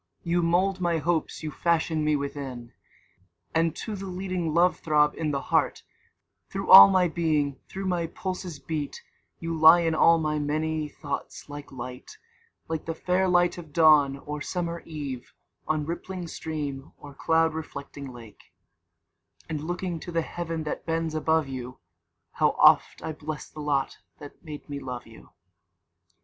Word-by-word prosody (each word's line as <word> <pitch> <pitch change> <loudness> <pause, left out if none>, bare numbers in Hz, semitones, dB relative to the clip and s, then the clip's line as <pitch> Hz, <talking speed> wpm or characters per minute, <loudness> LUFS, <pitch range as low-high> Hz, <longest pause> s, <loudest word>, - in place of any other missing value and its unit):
26 170 - -7
You 175 0 +3
mould 180 +3 +1
my 170 -2 +1
Hopes 160 +1 -1
you 155 - -3
fashion 160 -2 0
me 150 0 +2
within: 135 -4 -5 0.8
And 165 0 +1
to 220 - -5
the 195 0 -6
leading 185 -3 -3
love 175 +3 +3
throb 150 -1 +3
in 160 -2 -2
the 140 -2 -1
heart, - - +2 0.7
Through - - -3
all 100 - +12
my 185 -1 +3
being, 155 -5 0
through 195 0 -5
my 175 -3 0
pulses 185 -2 -5
beat; 150 0 -5 0.3
You 165 0 -4
lie 160 +2 +8
in 165 -1 +1
all 165 +1 +5
my 155 -1 -1
many 155 +1 -1
thoughts 145 0 -6
like 145 0 -9
Light, 125 -1 -8 0.5
Like 160 -1 -3
the 165 - -3
fair 185 +3 +1
light 175 -1 +2
of 155 -4 -12
Dawn, 150 -4 +5
or 150 +1 -6
summer 170 +1 -3
Eve, 140 -6 -6 0.3
On 155 -1 0
rippling 175 +2 -5
stream, 145 -4 -5
or 145 -1 -12
cloud 160 +3 +2
reflecting 140 -3 -7
lake; 115 -4 -14 1.0
And 155 -2 -4
looking 175 +1 -3
to 175 - -8
the 165 -1 0
Heaven 165 -2 -4
that 150 - -4
bends 165 -1 -2
above 160 -1 +1
you, 130 -1 -7 0.5
How - - +1
oft! - - +5
I - - -3
bless 155 0 -6
the 155 - -11
lot 140 -2 -1 0.2
that 145 -1 -12
made 150 -3 -9
me 145 -1 -5
love 125 -3 -6
you. 115 0 -16
160 Hz, 160 wpm, -26 LUFS, 145-170 Hz, 1.0 s, all